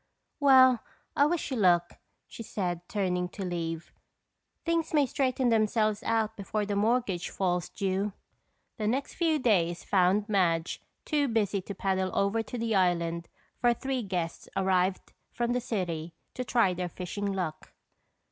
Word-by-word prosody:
"Well, 260 -3 +7 0.4
I 285 - +5
wish 325 -2 -2
you 260 - -1
luck," 175 -4 +3 0.3
she - - -9
said 180 -6 -3
turning 180 -5 -1
to 195 +1 -6
leave. 165 -2 -4 0.7
"Things 335 -1 0
may 290 -2 +5
straighten 260 -1 0
themselves 215 -1 +2
out 225 -2 0
before 210 +1 -2
the 205 0 -2
mortgage 210 -4 +1
falls 180 -2 -1
due." 195 +1 -1 0.7
The 215 -3 -1
next 265 +5 -1
few 325 -3 +1
days 175 - +1
found 195 +2 +2
Madge 175 -5 +1 0.2
too 295 -3 +1
busy 210 -4 0
to 200 +2 -7
paddle 190 0 0
over 200 +3 +2
to 245 - -6
the 230 -1 -1
island 170 -3 +1 0.3
for 240 -1 +3
three 265 +1 -2
guests 180 -5 -4
arrived 185 -1 +1 0.2
from 240 0 0
the 250 - 0
city 170 -8 -3 0.2
to 255 - -3
try 230 -7 +2
their 180 0 -3
fishing 200 +3 -4
luck. 180 -5 -4
200 Hz, 150 wpm, -29 LUFS, 180-240 Hz, 0.7 s, Well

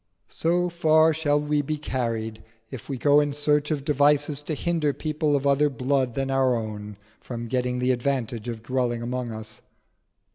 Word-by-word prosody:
So 175 +2 +1
far 160 -2 +4
shall 145 -2 +1
we 150 0 0
be 155 +2 -3
carried 115 -6 -3 0.3
if 130 -1 -8
we 135 - -2
go 145 +4 +5
in 145 -1 0
search 150 0 +1
of 145 -3 -2
devices 145 0 +2
to 155 +1 -3
hinder 160 -3 0
people 155 -1 -1
of 140 0 -1
other 140 +1 +3
blood 130 -1 0
than 135 0 -1
our 130 -2 +3
own 105 -2 -5 0.2
from 120 -2 -6
getting 125 +1 -1
the 125 +1 +1
advantage 120 -3 -2
of 115 -2 -5
dwelling 120 -1 -1
among 125 0 -3
us. 110 0 -9
135 Hz, 175 wpm, -25 LUFS, 120-150 Hz, 0.3 s, go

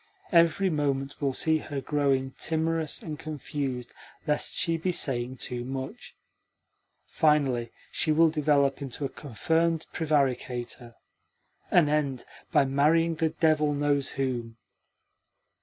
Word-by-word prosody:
Every 170 +2 +4
moment 140 -2 -1
will 140 -1 +1
see 160 +4 +1
her 145 -2 -5
growing 135 -2 0
timorous 160 -1 -1
and 155 -2 -6
confused 140 -5 -4 0.3
lest 150 -2 0
she 165 - +1
be 180 +3 -1
saying 130 -6 -1
too 120 0 -4
much. 135 - -6 0.9
Finally, 135 -7 +1 0.2
she 155 - 0
will 160 +1 +5
develop 145 -3 +2
into 140 +1 -4
a - - -2
confirmed 160 +6 -1
prevaricator, 125 -6 -1 0.7
and 170 -4 +5
end 145 -4 0 0.3
by 140 - +4
marrying 155 +5 +3
the 160 0 0
devil 155 -2 +2
knows 145 -1 +1
whom!" 120 -4 -3
145 Hz, 120 wpm, -27 LUFS, 135-160 Hz, 0.9 s, will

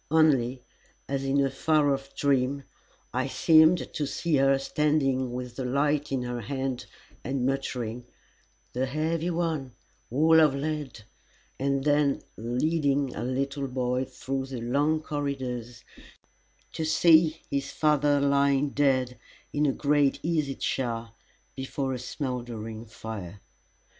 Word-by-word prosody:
Only, 135 -6 +3 0.4
as 135 0 -2
in 135 +1 +1
a 135 - -1
far 145 +1 +2
off 135 0 -6
dream, 140 0 +1 0.5
I 130 +2 0
seemed 160 +4 +4
to 150 - -2
see 160 +1 0
her 135 0 +4
standing 135 -3 +1
with 125 -1 -6
the 135 - -2
light 145 +3 0
in 130 -2 0
her 120 -1 -4
hand 130 +2 -3 0.4
and 130 -1 -1
muttering, 125 -3 -2 0.7
"The 130 +2 0
heavy 160 +4 -1
one 165 -7 -2 0.4
all 160 +6 +5
of 150 -3 +5
lead," 145 -5 -4 0.6
and 135 0 0
then 145 -1 +2
leading 140 +3 0
a 110 - -4
little 135 +2 -2
boy 125 0 -1
through 135 +1 -4
the 130 -3 -6
long 145 +6 +1
corridors 130 -5 -4 0.9
to 160 - -3
see 160 0 +4
his 140 0 -1
father 145 -2 +2
lying 140 0 +2
dead 130 -4 +1 0.3
in 150 0 +2
a - - +3
great 145 -1 +2
easy 155 -5 0
chair 115 -3 -2 0.4
before 135 0 -3
a 125 - -4
smouldering 120 -4 -5
fire. 110 -4 -7
135 Hz, 130 wpm, -27 LUFS, 125-150 Hz, 0.9 s, all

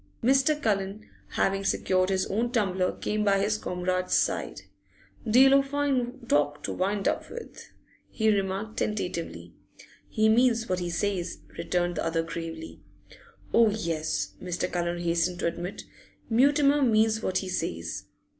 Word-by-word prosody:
Mr. 270 +4 +3
Cullen, 205 -3 -1 0.3
having 195 0 +1
secured 185 -1 +1
his 190 -1 +1
own 230 +4 -1
tumbler, 190 -6 +1
came 210 0 -2
by 200 -1 +3
his 210 +2 0
comrade's 180 0 -1
side. - - 0 0.7
'Deal 265 +4 +7
o' 275 - +6
fine 270 -3 -1
talk 145 -3 +1
to - - -3
wind 195 +2 -1
up - - -1
with,' 475 - -10 0.4
he 220 -2 +2
remarked 195 +2 -3
tentatively. 185 -5 -3 0.6
'He 215 -1 +2
means 230 0 +3
what 185 0 -1
he 175 -1 -3
says,' 180 +1 -2
returned 175 0 -1
the - - -1
other 165 0 0
gravely. 165 - -7 0.7
'Oh 230 -1 +6
yes,' 155 - -2
Mr. 180 0 -2
Cullen 175 0 -1
hastened 170 +1 +1
to - - -1
admit. 175 +3 -4 0.5
'Mutimer 285 +4 +4
means 220 -3 +3
what 185 - 0
he 190 - -2
says! 85 - -3
195 Hz, 145 wpm, -27 LUFS, 175-230 Hz, 0.7 s, Deal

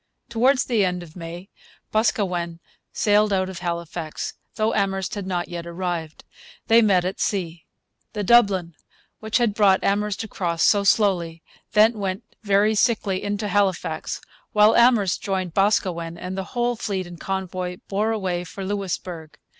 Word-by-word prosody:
Towards 255 +3 +3
the 230 -5 +2
end 180 -1 -1
of 160 -2 -14
May 175 +2 -8 0.4
Boscawen 180 -6 0 0.3
sailed 210 0 +3
out 185 -1 +1
of 185 -2 -7
Halifax, 170 -2 -4 0.2
though 215 +1 +1
Amherst 195 -2 -1
had 200 -3 -4
not 175 -2 -2
yet 170 -1 -6
arrived. 170 -3 -4 0.4
They 230 +1 +6
met 190 -5 +3
at 185 - -3
sea. 170 -5 -2 0.5
The 210 -1 -2
Dublin, 195 -6 +4 0.5
which 220 0 0
had 235 -4 +1
brought 200 -3 +4
Amherst 205 +1 0
across 175 -6 -2
so 205 -1 +4
slowly, 175 -6 +2 0.3
then 220 +1 +4
'went 195 +2 -3 0.2
very 205 +1 +3
sickly 205 -3 +1
into 205 0 -2
Halifax,' 200 -3 -1 0.3
while 210 0 +5
Amherst 235 -6 +4
joined 190 -4 -2
Boscawen, 175 -4 +1
and 180 +2 -5
the 190 -1 -3
whole 240 0 +1
fleet 200 -4 -3
and 175 -1 -11
convoy 185 -1 -3
bore 205 +3 0
away 185 -5 -2
for 190 +2 -7
Louisbourg. 180 -5 -4
195 Hz, 150 wpm, -23 LUFS, 175-210 Hz, 0.5 s, They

